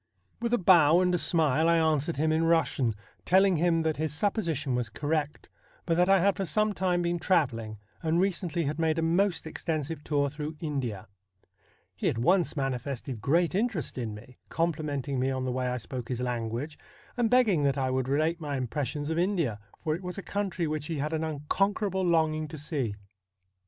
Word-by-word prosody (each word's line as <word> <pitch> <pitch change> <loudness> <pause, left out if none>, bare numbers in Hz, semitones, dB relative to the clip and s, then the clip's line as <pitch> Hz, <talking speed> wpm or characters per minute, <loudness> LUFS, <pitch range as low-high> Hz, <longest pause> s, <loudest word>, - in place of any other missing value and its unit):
' - - -40
With 235 0 -1
a 245 - +4
bow 170 -4 +6
and 180 -1 +2
a 175 - +2
smile 160 -1 +2
I 170 - +4
answered 160 -1 +1
him 155 +2 +2
in 160 +1 +2
Eussian, 160 -8 +2 0.3
telling 190 -1 +4
him 165 0 +2
that 160 -1 0
his 155 0 -1
supposition 160 - -1
was 125 -2 -1
correct, 150 +4 -2 0.4
but 165 - +1
that 180 +2 +3
I 195 0 +6
had 200 +1 +3
for 195 - -1
some 215 +5 +1
time 180 -2 0
been 170 0 0
travelling, 120 - 0 0.2
and 165 0 +1
recently 175 -3 0
had 150 +2 -3
made 160 -1 +1
a 165 - 0
most 175 +3 +1
THE 160 - -7
BLUE - - -6
STAR 165 - -1
27 - - 0
extensive 155 -2 -6
tour 145 -2 +1
through 150 +1 -5
India. 135 - -3 0.9
He - - 0
at - - -2
once 170 +7 +2
manifested 135 -3 -3
great 165 - +2
interest 205 - -1
in 115 -4 -4
me; 120 +4 -14
complimenting 145 -5 -1
me 130 +1 +1
on 130 -1 -2
the 130 - -1
way 125 0 -1
I 125 0 -1
spoke 125 0 -6
his 125 -2 -2
language, 125 +4 -3 0.4
and 240 -2 +1
begging 225 -10 +4
that 140 -1 +1
I 130 -1 0
would 130 -1 0
relate 155 +4 +1
my 145 -3 -3
impressions 145 +4 -3
of 160 - 0
India, 170 - 0 0.2
for 155 -2 0
it 170 - -4
was 180 0 -5
a 200 - -5
country 195 -4 -2
which 150 -1 -3
he 165 - -3
had 150 +3 -2
an 160 0 -1
unconquerable 190 +6 0
longing 160 -3 +1
to 155 +1 -8
see. 140 -8 -2
155 Hz, 210 wpm, -28 LUFS, 135-175 Hz, 0.9 s, bow